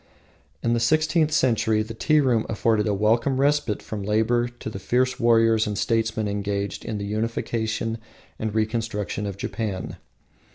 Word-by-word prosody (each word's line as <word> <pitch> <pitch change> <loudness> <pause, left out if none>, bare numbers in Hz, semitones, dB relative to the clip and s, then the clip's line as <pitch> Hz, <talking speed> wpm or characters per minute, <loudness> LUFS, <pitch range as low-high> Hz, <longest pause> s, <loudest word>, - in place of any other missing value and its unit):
In 115 - +2
the 120 - +2
sixteenth 155 +5 +2
century 115 -6 +2
the 110 +1 -7
tea 155 +7 +2
room 120 -5 +1
afforded 110 -1 +1
a 105 - +1
welcome 115 +6 +2
respite 140 -6 +1
from 105 -2 -5
labour 110 +4 +1
to 120 -1 -10
the 110 -3 -5
fierce 125 +5 0
warriors 115 -2 +4
and 105 -1 -3
statesmen 110 -1 0
engaged 100 0 -3
in 110 - -4
the 100 - -4
unification 110 +1 -2 0.4
and 110 -1 -3
reconstruction 110 -2 -2
of 100 -1 -5
Japan. 100 -3 -4
110 Hz, 155 wpm, -24 LUFS, 105-120 Hz, 0.4 s, warriors